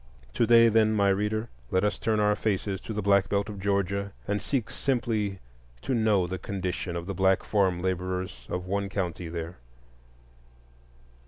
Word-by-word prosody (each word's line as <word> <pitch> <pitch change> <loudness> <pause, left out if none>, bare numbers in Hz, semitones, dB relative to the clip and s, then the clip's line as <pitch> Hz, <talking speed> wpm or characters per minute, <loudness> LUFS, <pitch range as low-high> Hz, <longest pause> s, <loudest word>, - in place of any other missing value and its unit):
To 115 - +2
day, 115 -1 +7
then, 110 -1 +3
my 100 -1 +3
reader, 105 +3 0 0.2
let 95 +1 +1
us 105 - 0
turn 110 -1 +1
our 105 0 +3
faces 100 -2 -1
to - - -7
the 105 -1 -2
Black 100 -1 +3
Belt 100 +1 0
of 100 -2 -7
Georgia 100 0 -1
and 100 0 0
seek 125 -6 -2
simply 110 -7 -1 0.5
to - - -1
know 110 -5 +3
the 90 +1 -4
condition 95 -2 -3
of 85 0 -4
the 100 - -4
black 95 0 +2
farm 95 -4 +1
laborers 90 -7 -3
of 90 0 -3
one 100 +1 -1
county 90 -3 -3
there. 85 +1 -5
100 Hz, 170 wpm, -27 LUFS, 95-105 Hz, 0.5 s, day